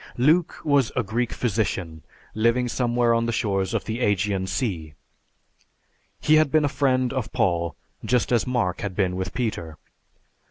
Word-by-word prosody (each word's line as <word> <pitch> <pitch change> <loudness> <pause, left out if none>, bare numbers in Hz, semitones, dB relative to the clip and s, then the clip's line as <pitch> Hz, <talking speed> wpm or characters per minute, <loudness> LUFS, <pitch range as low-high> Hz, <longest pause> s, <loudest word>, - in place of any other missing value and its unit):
Luke 155 +7 +3
was 140 -5 +2
a 130 - +1
Greek 115 +4 -1
physician 95 -8 -2 0.3
living 115 +3 +2
somewhere 120 -1 +1
on 115 0 +1
the - - 0
shores 100 -5 -1
of - - -1
the 110 +1 -3
Ægean 100 -3 0
Sea. 85 - -3 1.2
He 155 +1 +4
had 155 -2 +4
been 155 -1 +3
a - - +1
friend 130 -2 +1
of 130 -4 -3
Paul, 85 -3 0 0.3
just 125 0 +1
as 120 -1 +2
Mark 120 -8 -1
had 100 -4 -4
been 95 -3 0
with 95 0 -3
Peter. 90 -11 -3
115 Hz, 160 wpm, -24 LUFS, 95-125 Hz, 1.2 s, He